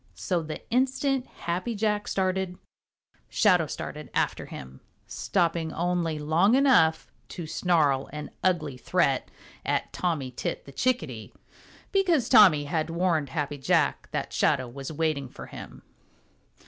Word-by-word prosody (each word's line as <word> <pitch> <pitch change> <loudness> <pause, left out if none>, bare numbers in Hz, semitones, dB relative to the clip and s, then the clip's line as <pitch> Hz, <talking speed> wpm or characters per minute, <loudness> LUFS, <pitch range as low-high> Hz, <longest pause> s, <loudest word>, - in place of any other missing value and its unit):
So 180 -3 -1
the 155 -1 -7
instant 265 +1 +1
Happy 185 +7 -3
Jack 210 0 0
started, 185 -1 -1 0.7
Shadow 180 -6 +3
started 150 -1 -6
after - - 0
him, 65 0 -10 0.2
stopping 170 -3 -1
only 170 -2 -1
long 160 +9 +3
enough 245 - +4 0.2
to 175 - -7
snarl 155 -5 +1
an 150 0 -7
ugly 160 -7 0
threat - - +1 0.3
at - - -1
Tommy 155 -8 -1
Tit 125 - -4
the 140 - -11
Chickadee, 140 - -2 0.6
because 350 - +2
Tommy 165 -8 +7
had 155 +2 -2
warned 165 -4 0
Happy 145 +1 -3
Jack 135 - +1
that - - -4
Shadow 130 - +2
was 135 +4 -7
waiting 155 -4 -1
for - - -10
him. - - -10
165 Hz, 130 wpm, -27 LUFS, 150-190 Hz, 0.7 s, Tommy